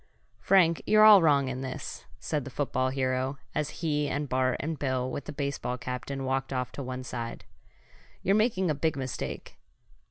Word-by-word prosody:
"Frank, 170 -4 +4
you're 215 0 +6
all 210 -3 +10
wrong 145 -4 +4
in 130 0 -4
this," 130 -1 -6
said 150 -3 -2
the 135 - -7
football 130 -1 -1
hero, 130 +1 -1 0.2
as 150 -1 -1 0.2
he 150 -2 +1
and 145 0 -2
Bart 130 0 +1
and 160 +1 -3
Bill, 130 -2 0
with 140 - -5
the - - -6
baseball 140 -3 -3
captain 130 +2 -5
walked 135 +1 -1
off 125 -2 -2
to - - -6
one 130 -1 -5
side. 115 -2 -6 0.8
"You're 195 - +3
making 205 -5 +2
a - - +2
big 155 +2 0
mistake!" 130 -2 -5
140 Hz, 180 wpm, -28 LUFS, 130-155 Hz, 0.8 s, all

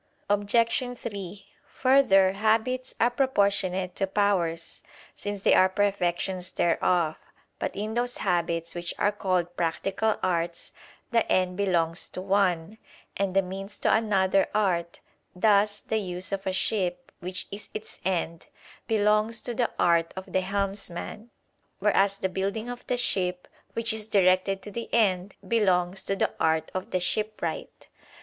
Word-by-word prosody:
Obj. 230 +4 +1
3: 200 -4 -7 0.2
Further, 255 -8 +4
habits 225 +5 0
are 240 +2 +4
proportionate 200 -8 +1
to 195 - 0
powers, 190 -5 0 0.3
since 205 -1 -5
they - - +5
are 185 - +6
perfections 185 -2 0
thereof. 170 -1 +1 0.4
But - - -3
in 215 +2 -3
those 245 +1 -1
habits 170 -3 -1
which 175 0 -4
are 205 - +2
called 185 -4 -1
practical 195 +6 0
arts, 170 -2 -1 0.4
the 230 -2 +1
end 185 -1 +2
belongs 175 -4 0
to 185 - -6
one, 195 0 0 0.4
and 195 -1 -1
the 195 - +4
means 195 +2 -6
to - - +2
another 195 -3 +2
art; 175 -5 0 0.3
thus 205 +1 +3
the 220 - -1
use 180 -2 -2
of 195 -1 -3
a - - +1
ship, 190 +4 -1
which 180 0 -4
is 200 +1 -7
its 215 - -8
end, 170 -3 -2 0.4
belongs 215 +1 +2
to 245 - -4
the 240 0 0
(art 170 -1 +2
of 190 - -8
the) 185 - +3
helmsman; 195 +2 -4 0.5
whereas 200 -1 +2
the 190 - -1
building 200 +5 -3
of 245 - -8
the 250 - 0
ship, 180 -6 +1 0.3
which 230 0 +1
is 220 -1 -3
directed 190 -1 +2
to 205 - -8
the 230 +3 -6
end, 195 -4 +1
belongs 190 -4 +2
to 195 - -2
the - - 0
art 160 0 +1
of 185 0 -4
the 185 - 0
shipwright. 210 -3 -2
195 Hz, 145 wpm, -27 LUFS, 180-215 Hz, 0.5 s, are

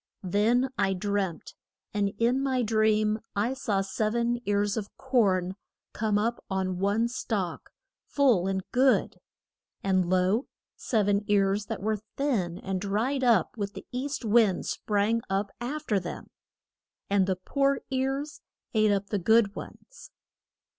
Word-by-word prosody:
Then 225 +8 +2
I 195 0 +2
dreamt, 195 -2 -2 0.4
and 205 -1 +1
in 240 +4 +2
my 260 -2 +1
dream 215 -1 +2 0.2
I 215 +6 +1
saw 210 -7 -1
sev 215 +3 -1
en 235 0 +1
ears 205 0 +1
of 210 -3 -3
corn 200 -9 +1 0.4
come 215 -1 0
up 230 +3 -1
on 190 -2 -1
one 205 +4 +2
stalk, 205 -7 -3 0.4
full 245 -11 +3
and 190 -1 -1
good. 260 +1 +2 0.6
And 185 -2 +2
lo, 185 +7 +2 0.3
sev 215 -4 0
en 205 0 +2
ears 200 0 +2
that - - -5
were 215 0 0 0.2
thin 210 -12 0
and 190 -1 -3
dried 225 +7 0
up 230 -8 +3
with 200 -1 -3
the - - -9
east 260 0 -3
wind 215 -4 +3
sprang 215 +2 0
up 195 +1 -1
af 295 +5 -4
ter 210 -7 +2
them. 175 -2 -8 0.8
And 200 -2 +2
the 190 - +1
poor 275 +9 0
ears 270 +3 -2 0.3
ate 215 -2 +4
up 200 0 -1
the 205 - +1
good 220 +2 +3
ones. - - -11
210 Hz, 145 wpm, -28 LUFS, 195-240 Hz, 0.8 s, ate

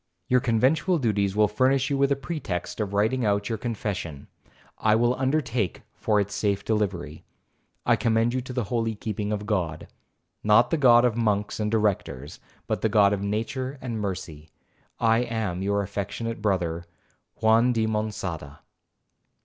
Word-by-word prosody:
Your 125 - +4
conventual 130 - +2
duties 100 -7 0
will 105 0 +4
furnish 130 +6 +1
you 140 - +1
with 140 0 +3
a - - +4
pretext 135 - -4
of 105 -2 -2
writing 110 +5 +1
out 100 0 +1
your 110 -2 -2
confession,—I 105 - -3
will 120 +2 +3
undertake 130 - -1
for 105 -1 +1
its 100 0 -2
safe 100 -2 -1
delivery. 90 -8 -2 0.6
I - - +4
commend 115 +1 +2
you 130 - 0
to 130 - -8
the 125 -1 -1
holy 115 +1 -1
keeping 105 0 -3
of 105 0 -2
God,—not 105 +4 -1
the 165 - +2
God 120 -4 +6
of 120 -3 +1
monks 105 -3 0
and 105 0 0
directors, 100 - -1 0.3
but - - -2
the 110 - +2
God 105 -2 +4
of 100 - -2
nature 130 +7 -3
and 115 -4 -4
mercy.—I 95 +5 -3
am 110 -7 -2
your 100 +1 0
affectionate 100 +3 -4
brother, 85 -5 -1 0.5
JUAN 115 +2 +4
DI 115 -2 +1
MONÇADA.' 100 -9 -3
110 Hz, 150 wpm, -26 LUFS, 100-120 Hz, 0.6 s, God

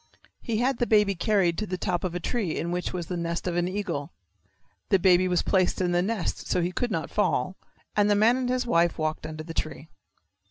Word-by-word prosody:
He 225 -2 -2
had 250 +2 +1
the 240 - +1
baby 210 -2 +4
carried 190 -3 +1
to 215 - -3
the 185 - -3
top 180 -2 -1
of 180 -2 -2
a - - -1
tree 195 -2 -2
in 170 - -2
which 180 0 -2
was 175 -2 -4
the 180 - -4
nest 170 0 -3
of 180 -2 -1
an 175 0 +1
eagle. 185 -7 -3 0.8
The 195 - +5
baby 185 0 +4
was 180 -1 +1
placed 185 -2 +1
in 180 -2 +1
the 175 0 +2
nest 205 0 -2
so - - +1
he 175 +1 0
could 245 +7 -1
not 165 -6 -3
fall, 190 -2 0 0.4
and 205 0 +3
the 205 - +4
man 220 +4 +5
and 255 -1 -1
his 255 0 0
wife 170 -6 +2
walked 155 -1 -2
under 155 0 -6
the 165 +1 -7
tree. 155 0 -4
180 Hz, 235 wpm, -26 LUFS, 170-210 Hz, 0.8 s, The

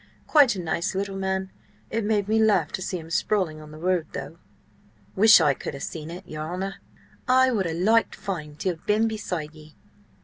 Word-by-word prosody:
Quite 285 -7 +5
a - - -5
nice 170 +1 -2
little 195 0 -2
man... 190 0 -2 0.4
It 225 - -1
made 205 -1 +1
me 220 +1 +2
laugh 205 -8 +3
to - - -4
see 185 0 -3
him 165 -1 -10
sprawling 180 -4 0
on 155 - -12
the 155 - -11
road, 175 -1 0
though!" 140 +4 -7 0.8
"Wish 215 +1 +8
I 150 -4 +4
could 135 - -6
have 140 - -7
seen 155 -1 -6
it, 180 +3 -9
your 155 0 -6
honour. 195 +2 -4 0.5
I 260 0 +5
would 200 -7 0
ha' 160 - -3
liked 220 +6 +2
fine 155 -7 -5
to 185 +4 -1
ha' 160 - -18
been 215 +2 +3
beside 180 -8 -4
ye." 155 0 -15
185 Hz, 205 wpm, -25 LUFS, 160-210 Hz, 0.8 s, Wish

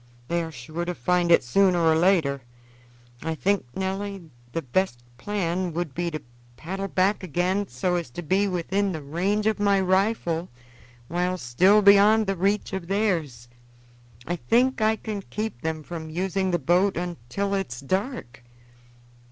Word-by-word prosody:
They 170 0 +1
are 165 -1 -5
sure 155 +5 -6
to 175 0 -3
find 180 -1 +1
it, 170 - +6
sooner 185 +8 +3
or 165 -2 +4
later. 160 -6 +2 0.8
I 160 +1 -2
think, 200 +4 +1
Nelly, 190 -2 -4 0.2
the 165 - -3
best 125 -2 -1 0.2
plan 185 -3 -2
would 165 -4 -3
be 175 +2 -2
to 155 -3 -6 0.3
paddle 195 +4 -4
back 195 +2 +1
again 185 +3 0
so 175 +8 -1
as 170 -7 -4
to 175 +9 -7
be 190 +6 +2
within 190 +2 -1
the 155 -3 -6
range 190 +9 -1
of 220 -1 +1
my 200 -1 +3
rifle 185 -3 +1 0.6
while 180 +3 -1
still 185 +11 +4
beyond 205 +2 +6
the 195 0 -1
reach 195 +3 0
of 190 -3 -4
theirs. 170 - -1 0.8
I 175 - -2
think 240 - +2
I 215 +1 +3
can 215 -2 -5
keep 215 - -5
them 160 -1 -3
from 160 0 -7
using 190 +3 -1
the 175 - +2
boat 175 +6 +2
until 175 +3 -3
it 195 -8 -1
is 125 - -6
dark." 185 - -3
180 Hz, 160 wpm, -25 LUFS, 160-200 Hz, 0.8 s, it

